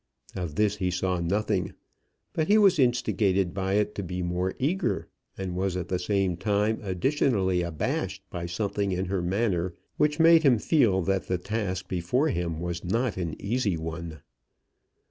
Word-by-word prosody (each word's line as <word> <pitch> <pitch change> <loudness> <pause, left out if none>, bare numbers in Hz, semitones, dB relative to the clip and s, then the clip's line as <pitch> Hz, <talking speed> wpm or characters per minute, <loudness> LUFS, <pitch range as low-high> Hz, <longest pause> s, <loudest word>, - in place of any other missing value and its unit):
Of 85 -5 -4
this 105 +1 +2
he 90 -2 0
saw 90 0 -1
nothing; 95 +1 -1 0.6
but 160 -1 0
he 210 - +5
was 195 -6 +5
instigated 105 -7 +2
by 95 0 -1
it 105 0 +1
to - - -4
be 90 -1 -4
more 90 +2 -1
eager, 170 +8 0 0.3
and 95 -2 -4
was 95 0 -1
at 90 - -4
the 90 - 0
same 95 -2 0
time 105 +3 +1
additionally 95 - +1
abashed 85 -3 -2
by 85 -1 -4
something 100 +2 -1
in 90 +1 -1
her 95 0 -1
manner 90 -2 0 0.2
which 150 +1 +2
made 165 0 +7
him 135 -6 +5
feel 105 - +3
that 95 +1 0
the 90 - 0
task 95 -1 -3
before 95 - 0
him 85 - -2
was 85 0 -4
not 115 +3 0
an 85 -4 -4
easy 105 -4 0
one. 80 -1 -6
95 Hz, 165 wpm, -27 LUFS, 90-110 Hz, 0.6 s, made